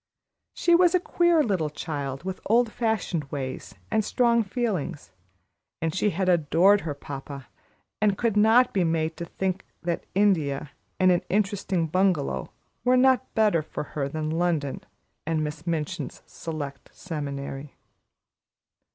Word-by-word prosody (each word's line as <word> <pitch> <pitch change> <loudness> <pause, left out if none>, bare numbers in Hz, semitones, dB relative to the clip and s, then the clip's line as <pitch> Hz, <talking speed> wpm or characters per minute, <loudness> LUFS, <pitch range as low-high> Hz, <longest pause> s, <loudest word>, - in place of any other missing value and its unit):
She 345 - +3
was 350 +1 +5
a - - +5
queer 345 -2 +3
little 185 - 0
child, 140 -2 -4
with 190 0 -4
old 230 +1 +3
fashioned 215 - -1
ways 135 -2 -6 0.2
and 220 -1 +2
strong 235 +1 +3
feelings, 195 - -3 0.7
and 165 -1 -1
she 210 +4 +1
had 190 0 -1
adored 180 +4 +4
her 150 -3 -4
papa, 140 -2 -8 0.5
and 205 -2 +3
could 230 -3 0
not 225 +4 +5
be 190 - +2
made 160 -1 0
to 170 - -4
think 190 +2 -2 0.2
that 170 -1 -2
India 155 -9 +2 0.3
and 185 -1 +5
an 175 - +3
interesting 195 -3 0
bungalow 160 - 0 0.3
were 250 +1 +4
not 260 0 +3
better 210 -7 +3
for 155 - -5
her 140 -2 -1
than 155 +1 -3
London 160 -4 0 0.5
and 160 -1 +1
Miss 150 +2 -6
Minchin's 155 -3 -3
Select 145 -4 -6
Seminary. 140 -4 -6
175 Hz, 140 wpm, -26 LUFS, 150-210 Hz, 0.7 s, was